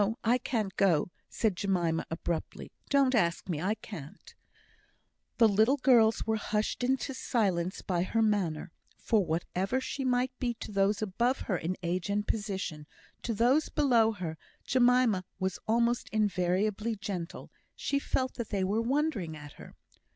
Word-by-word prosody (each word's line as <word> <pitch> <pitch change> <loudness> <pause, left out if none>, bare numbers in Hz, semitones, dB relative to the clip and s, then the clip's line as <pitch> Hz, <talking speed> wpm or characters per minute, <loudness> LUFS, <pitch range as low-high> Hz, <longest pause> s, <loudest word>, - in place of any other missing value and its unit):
I 240 +2 +3
can't 215 -6 -2
go!" 180 -4 +3 0.2
said 215 -5 0
Jemima, 175 -4 0
abruptly. 165 0 -4 0.2
"Don't 275 -2 +4
ask 175 -8 +1
me 160 -5 -2
I 200 +5 0
can't." 160 -11 -10 1.0
The 230 - +7
little 220 +7 +3
girls 235 -5 +4
were 220 0 +1
hushed 215 +3 -2
into 265 +2 0
silence 190 -9 -1
by 175 -2 0
her 225 +5 +1
manner; 185 -8 0 0.3
for 220 -4 +2
whatever 180 +7 -1
she 270 +1 -4
might 250 0 +1
be 240 -2 -1
to 220 - -8
those 200 +1 +1
above 235 +6 0
her 195 - -1
in 175 +2 -2
age 175 +3 -2
and 205 +1 -1
position, 190 -8 -3 0.3
to 230 - -2
those 255 +8 +3
below 240 -7 +3
her 170 -5 -5 0.3
Jemima 245 -6 +3
was 190 -1 -2
almost 235 +2 +1
invariably 210 +2 0
gentle. 190 -5 -6 0.2
She 280 - -1
felt 260 -2 -1
that 235 -3 -4
they 195 -3 0
were 205 +4 +1
wondering 235 - -1
at 145 -1 -10
her. - - -12
210 Hz, 150 wpm, -30 LUFS, 180-240 Hz, 1.0 s, The